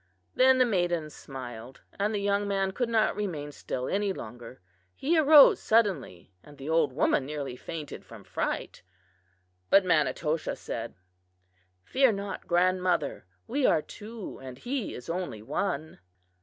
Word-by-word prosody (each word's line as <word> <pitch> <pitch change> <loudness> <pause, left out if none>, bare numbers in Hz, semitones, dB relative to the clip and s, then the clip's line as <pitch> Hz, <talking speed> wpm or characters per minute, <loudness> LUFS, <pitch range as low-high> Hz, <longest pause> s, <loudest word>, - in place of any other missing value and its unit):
Then 260 0 +5
the 255 - +5
maiden 175 -7 0
smiled, 125 -3 -9 0.2
and 205 +2 +1
the 215 - -1
young 200 0 0
man 195 -1 0
could 240 +4 -2
not 220 -2 +2
remain 160 -8 -4
still 130 -2 -4
any 200 0 0
longer. 120 - -9 0.4
He 320 +5 +1
arose 305 -2 +8
suddenly 180 - 0
and 145 +6 -16
the 135 - -8
old 160 -3 +2
woman 135 0 +2
nearly 140 -2 -5
fainted 150 +2 -7
from - - -13
fright. - - -3 0.9
But 195 -1 +6
Manitoshaw 155 -1 +1
said: - - -6 0.9
"'Fear 260 - +3
not, 200 0 -5
grandmother; 180 - +1 0.2
we 275 +2 +1
are 155 - +3
two 215 0 -9
and 130 -1 -9
he 245 - -3
is 125 - -9
only 170 - -4
one. 160 - -3
180 Hz, 140 wpm, -28 LUFS, 145-210 Hz, 0.9 s, arose